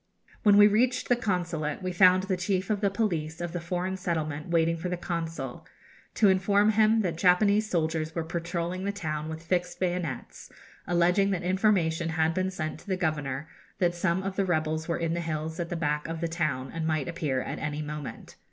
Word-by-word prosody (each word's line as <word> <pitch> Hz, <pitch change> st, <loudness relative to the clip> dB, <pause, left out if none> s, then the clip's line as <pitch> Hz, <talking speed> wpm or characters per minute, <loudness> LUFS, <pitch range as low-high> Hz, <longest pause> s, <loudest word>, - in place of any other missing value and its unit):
When 205 Hz, -2 st, +6 dB
we 205 Hz, -, +9 dB
reached 230 Hz, +5 st, +2 dB
the 245 Hz, -, +5 dB
Consulate 175 Hz, -8 st, -2 dB
we 185 Hz, -, -1 dB
found 185 Hz, +1 st, +5 dB
the 190 Hz, -1 st, 0 dB
chief 185 Hz, +2 st, -1 dB
of 210 Hz, -1 st, 0 dB
the 200 Hz, -, +3 dB
police 170 Hz, -7 st, -2 dB
of 175 Hz, -1 st, -3 dB
the 175 Hz, 0 st, -4 dB
foreign 180 Hz, +2 st, -2 dB
settlement 155 Hz, -4 st, -3 dB
waiting 165 Hz, -1 st, +2 dB
for 175 Hz, +2 st, -4 dB
the 180 Hz, -, -2 dB
Consul, 165 Hz, -7 st, -4 dB, 0.5 s
to 215 Hz, -, +5 dB
inform 200 Hz, +2 st, +4 dB
him 220 Hz, +1 st, +4 dB
that 170 Hz, -5 st, -2 dB
Japanese 200 Hz, +4 st, +4 dB
soldiers 160 Hz, -2 st, -1 dB
were 165 Hz, -, -1 dB
patrolling 170 Hz, +2 st, -3 dB
the 200 Hz, -, 0 dB
town 155 Hz, -6 st, -4 dB
with 160 Hz, +1 st, -6 dB
fixed 180 Hz, +1 st, -1 dB
bayonets, 175 Hz, -7 st, -3 dB, 0.4 s
alleging 180 Hz, +3 st, +3 dB
that 190 Hz, -3 st, -1 dB
information 180 Hz, -3 st, +2 dB
had 160 Hz, 0 st, +1 dB
been 185 Hz, +2 st, 0 dB
sent 155 Hz, -4 st, -4 dB
to -, -, -18 dB
the 190 Hz, -2 st, 0 dB
Governor 150 Hz, -4 st, -2 dB, 0.3 s
that 175 Hz, -2 st, +2 dB
some 175 Hz, +1 st, 0 dB
of 190 Hz, 0 st, -4 dB
the 200 Hz, -, +3 dB
rebels 160 Hz, -3 st, -1 dB
were 170 Hz, -, 0 dB
in 165 Hz, -1 st, -1 dB
the 170 Hz, -, -1 dB
hills 160 Hz, 0 st, -4 dB
at 170 Hz, -1 st, -3 dB
the -, -, -3 dB
back 150 Hz, -2 st, -1 dB
of 165 Hz, 0 st, -4 dB
the 170 Hz, -, -1 dB
town, 155 Hz, -6 st, -2 dB
and 165 Hz, -1 st, -2 dB
might 155 Hz, -3 st, 0 dB
appear 155 Hz, -7 st, -1 dB
at -, -, -5 dB
any 150 Hz, 0 st, -3 dB
moment. 150 Hz, -2 st, -7 dB
170 Hz, 205 wpm, -28 LUFS, 160-190 Hz, 0.5 s, we